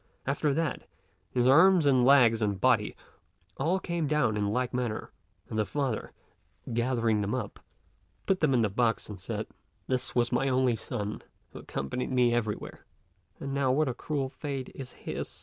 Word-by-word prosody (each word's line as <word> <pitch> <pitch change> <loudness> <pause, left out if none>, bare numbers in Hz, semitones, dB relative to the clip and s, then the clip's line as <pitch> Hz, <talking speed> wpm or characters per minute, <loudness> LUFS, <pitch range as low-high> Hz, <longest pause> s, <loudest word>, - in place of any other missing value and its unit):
After 145 +2 +1
that, 165 -3 -2 0.4
his 125 -1 +1
arms, 165 +5 +6
and 130 -3 +4
legs, 120 -4 +6
and 100 -3 0
body, 120 -4 +2 0.6
all 170 +7 +1
came 170 -4 -2
down 140 -7 +2
in 105 -1 0
like 125 +2 -1
manner; 120 -3 -2 0.4
and 110 - -3
the - - +4
father, 135 -5 -2 0.6
gathering 115 -2 +1
them 100 +4 -1
up, 110 -5 -5 0.7
put 190 -1 +1
them 145 -4 +3
in 120 - +3
the 105 - +2
box 115 +3 0
and 105 - -8
said, - - -4 0.4
"This 130 0 -2
was 120 -1 +2
my 130 +2 +1
only 130 -2 +2
son, 105 -2 -4 0.3
who - - -9
accompanied 70 - -4
me 125 -2 +3
everywhere; 110 -3 -3 0.6
and 140 0 -4
now 140 -2 +2
what 150 +3 +2
a 130 - -1
cruel 140 +2 -2
fate 135 -1 -5
is 130 -2 -8
his. - - -6
125 Hz, 170 wpm, -29 LUFS, 115-140 Hz, 0.7 s, arms